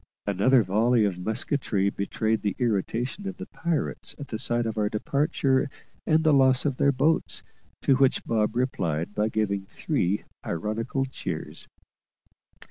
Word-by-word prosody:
Another 110 +5 +4
volley 110 +4 +3
of 95 -3 -2
musketry 105 -1 0
betrayed 110 +3 -1
the 100 -2 -1
irritation 120 - -1
of 195 - -5
the - - -6
pirates 170 -3 -3
at 140 - -8
the 110 - -4
sight 120 +1 +1
of 110 - -2
our 105 -1 +1
departure 140 +3 +1 0.4
and 160 0 +3
the 155 -2 +4
loss 130 -1 +4
of 135 -3 0
their 140 - +4
boats, 150 +4 0 0.4
to 135 - +4
which 135 -1 +2
Bob 110 -1 0
replied 85 - -1
by 105 +1 +1
giving 100 -3 -1
three 95 +2 -1 0.2
ironical 115 +9 -2
cheers. 130 - -6
115 Hz, 145 wpm, -26 LUFS, 105-135 Hz, 0.4 s, Another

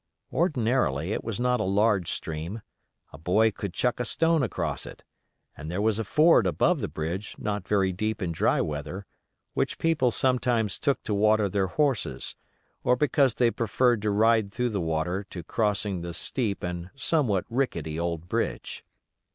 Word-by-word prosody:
Ordinarily, 115 - +1
it - - -3
was 115 -1 -4
not 125 0 +2
a - - +1
large 100 -1 +2
stream; 80 +7 -4 0.5
a 70 - -10
boy 105 +7 +3
could 100 -1 -5
chuck 125 +7 0
a - - +1
stone 165 +4 +2
across 125 - -2
it, - - -11 0.5
and 75 - -8
there 90 +3 -2
was 110 +1 +1
a - - 0
ford 150 - +4
above 85 - +2
the - - -1
bridge 85 +6 -4
not 105 -3 -3
very 95 -3 +2
deep 110 +4 -2
in 90 -4 -2
dry 80 - +2
weather, 75 +6 -4 0.5
which - - -1
people 160 -6 +2
sometimes 120 -3 +1
took 140 -3 0
to 105 - -2
water 105 0 +3
their 95 0 0
horses, 135 +2 -1 0.5
or 125 - +4
because 140 -2 +2
they 120 -2 +3
preferred 120 0 +1
to 105 - 0
ride 110 0 +3
through 125 +3 -1
the 100 -4 -2
water 85 +4 -1
to 85 - -7
crossing 100 -1 0
the 85 -1 -5
steep 110 0 -1
and 90 0 -4
somewhat 130 - +1
rickety 85 - -2
old 85 -1 -3
bridge. - - -3
105 Hz, 170 wpm, -27 LUFS, 90-125 Hz, 0.5 s, ford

